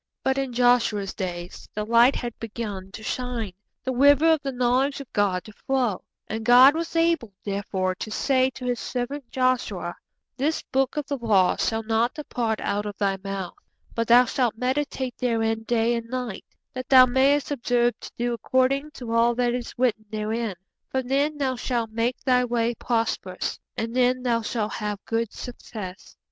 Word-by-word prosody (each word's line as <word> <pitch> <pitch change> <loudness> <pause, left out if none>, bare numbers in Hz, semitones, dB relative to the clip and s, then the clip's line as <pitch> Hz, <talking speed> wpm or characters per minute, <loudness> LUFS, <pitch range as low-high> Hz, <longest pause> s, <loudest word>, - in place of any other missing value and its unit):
But 265 0 +1
in 270 -2 -2
Joshua's 240 -5 +2
days 175 -2 -6
the 210 0 -2
light 235 +4 +5
had 240 -2 -4
begun 210 -4 -6
to 220 - -8
shine, 240 -5 -3 0.3
the 260 - -2
river 285 +5 +5
of 315 -2 +2
the 275 -2 -3
knowledge 255 +3 +1
of 275 - -10
God 195 -3 +1
to 215 - -12
flow, 250 -5 -1 0.2
and 220 +1 -4
God 250 +4 +8
was 330 +1 -4
able, 330 -10 +1
therefore, 195 -2 -1
to 200 - -6
say 260 +3 +2
to 255 - -7
His 245 -1 -1
servant 255 +1 -4
Joshua: 255 -1 0 0.5
'_This 305 +4 0
book 270 +1 +1
of 295 - -1
the 285 -1 -3
law 200 -6 +3
shall 225 0 0
not 225 +2 +1
depart 235 -7 -2
out 205 +1 -1
of 205 - -6
thy 195 -2 +1
mouth; 195 -2 -4 0.4
but 230 -1 -1
thou 245 +2 +7
shall 250 0 +1
meditate 260 0 -2
therein 225 -2 0
day 235 0 +2
and 230 -1 -4
night, 250 -5 -4 0.3
that 255 -1 -6
thou 255 -1 +9
mayest 270 +3 +2
observe 245 -3 +1
to - - -9
do 240 0 0
according 260 +4 +1
to 240 -3 -6
all 230 +1 +3
that 245 0 +1
is 245 -1 -4
written 230 -3 +1
therein: 215 0 -2 0.3
for 260 0 -1
then 280 +4 0
thou 265 -3 0
shall 240 -1 -1
make 230 +3 -2
thy 250 -1 +3
way 235 -1 0
prosperous, 225 -6 -2 0.2
and 230 +1 -3
then 255 0 +2
thou 235 -2 +1
shall 215 -1 -2
have 210 -2 -3
good 230 -1 -1
success. 210 -6 -8
240 Hz, 180 wpm, -25 LUFS, 220-260 Hz, 0.5 s, thou